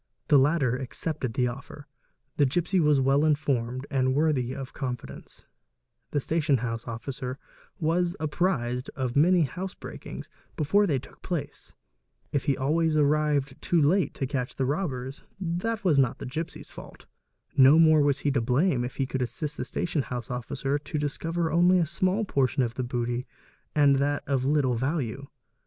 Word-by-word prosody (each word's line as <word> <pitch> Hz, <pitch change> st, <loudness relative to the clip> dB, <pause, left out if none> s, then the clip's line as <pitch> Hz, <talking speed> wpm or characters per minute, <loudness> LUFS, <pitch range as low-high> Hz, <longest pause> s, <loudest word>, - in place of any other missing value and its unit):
The 145 Hz, -3 st, +7 dB
latter 135 Hz, -3 st, +2 dB
accepted 130 Hz, 0 st, -3 dB
the 125 Hz, -, +2 dB
offer, 140 Hz, +3 st, -8 dB, 0.5 s
the 145 Hz, -, +5 dB
gipsy 175 Hz, +7 st, +1 dB
was 150 Hz, -3 st, +4 dB
well 135 Hz, +2 st, +3 dB
informed 135 Hz, -5 st, 0 dB
and 130 Hz, -1 st, +1 dB
worthy 145 Hz, -5 st, +1 dB
of 135 Hz, -1 st, -7 dB
confidence, 125 Hz, -3 st, -7 dB, 0.6 s
the 145 Hz, -, 0 dB
station 150 Hz, -1 st, +1 dB
house 115 Hz, -1 st, -4 dB
officer 125 Hz, +2 st, -5 dB, 0.4 s
was 175 Hz, +2 st, +1 dB
apprized 145 Hz, -6 st, -1 dB
of 130 Hz, -3 st, -2 dB
many 175 Hz, +5 st, +5 dB
house 180 Hz, +7 st, -4 dB
breakings -, -, -8 dB, 0.3 s
before 200 Hz, +7 st, +3 dB
they 145 Hz, -6 st, +1 dB
took 130 Hz, -, -11 dB
place; 145 Hz, -5 st, -5 dB, 0.6 s
if 140 Hz, -3 st, -1 dB
he 140 Hz, -3 st, +1 dB
always 155 Hz, +3 st, +1 dB
arrived 150 Hz, -2 st, +1 dB
too 175 Hz, -, +2 dB
late 160 Hz, +3 st, +2 dB
to 135 Hz, -, -2 dB
catch 130 Hz, -2 st, -3 dB
the 135 Hz, -, 0 dB
robbers, 135 Hz, -3 st, -3 dB, 0.2 s
that 190 Hz, +5 st, -2 dB
was 160 Hz, -7 st, +4 dB
not 130 Hz, -3 st, +2 dB
the -, -, -7 dB
gipsy's 160 Hz, +6 st, -6 dB
fault; -, -, -12 dB, 0.5 s
no 135 Hz, +3 st, +7 dB
more 155 Hz, -2 st, +6 dB
was 140 Hz, -1 st, +2 dB
he 145 Hz, -, +1 dB
to 135 Hz, -3 st, +1 dB
blame 125 Hz, +3 st, +2 dB
if 125 Hz, -, -5 dB
he 135 Hz, -, 0 dB
could 130 Hz, 0 st, -3 dB
assist 145 Hz, +4 st, -3 dB
the -, -, -3 dB
station 165 Hz, +2 st, -1 dB
house 125 Hz, -2 st, -5 dB
officer 135 Hz, +3 st, -2 dB
to 145 Hz, +1 st, -5 dB
discover 165 Hz, +3 st, -2 dB
only 175 Hz, +2 st, +5 dB
a 170 Hz, -, +3 dB
small 185 Hz, +6 st, 0 dB
portion 135 Hz, -6 st, +1 dB
of 115 Hz, -1 st, -2 dB
the 130 Hz, -, -3 dB
booty 120 Hz, +1 st, -2 dB, 0.5 s
and 145 Hz, -2 st, +5 dB
that 145 Hz, +1 st, 0 dB
of 135 Hz, -2 st, 0 dB
little 140 Hz, -3 st, +2 dB
value. 135 Hz, 0 st, -2 dB
140 Hz, 170 wpm, -27 LUFS, 130-160 Hz, 0.6 s, The